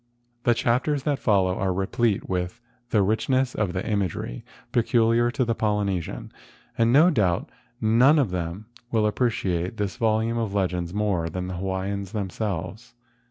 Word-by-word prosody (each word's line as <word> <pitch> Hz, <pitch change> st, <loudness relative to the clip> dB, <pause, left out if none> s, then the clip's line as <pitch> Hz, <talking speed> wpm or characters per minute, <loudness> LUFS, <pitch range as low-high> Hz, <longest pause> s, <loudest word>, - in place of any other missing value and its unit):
The 120 Hz, -, +4 dB
chapters 130 Hz, +5 st, +1 dB
that 145 Hz, -2 st, 0 dB
follow 95 Hz, -4 st, +2 dB
are 95 Hz, 0 st, 0 dB
replete 95 Hz, +3 st, 0 dB
with 90 Hz, +4 st, -2 dB, 0.3 s
the 105 Hz, -3 st, +3 dB
richness 125 Hz, +5 st, +1 dB
of 105 Hz, -4 st, -1 dB
the 90 Hz, -, -3 dB
imagery 95 Hz, -, -2 dB, 0.3 s
peculiar 120 Hz, 0 st, +3 dB
to 130 Hz, +1 st, 0 dB
the 115 Hz, -, +1 dB
Polyne¬ 105 Hz, -4 st, 0 dB
sian, -, -, -8 dB, 0.4 s
and 115 Hz, 0 st, +3 dB
no 155 Hz, +7 st, +6 dB
doubt 95 Hz, -, 0 dB, 0.3 s
none 110 Hz, -, +2 dB, 0.3 s
will 110 Hz, -2 st, +2 dB
appreciate 105 Hz, -5 st, 0 dB
this 100 Hz, -4 st, -3 dB
vol¬ 110 Hz, -1 st, +2 dB
ume 115 Hz, +1 st, -1 dB
of 105 Hz, -3 st, -2 dB
legends 90 Hz, -3 st, -1 dB
more 100 Hz, -5 st, 0 dB
than 90 Hz, +2 st, -4 dB
the 95 Hz, -, -5 dB
people 95 Hz, +2 st, -3 dB
of -, -, -1 dB
Hawaii 100 Hz, +1 st, -3 dB
themselves. 100 Hz, +1 st, -4 dB
105 Hz, 160 wpm, -25 LUFS, 95-115 Hz, 0.4 s, no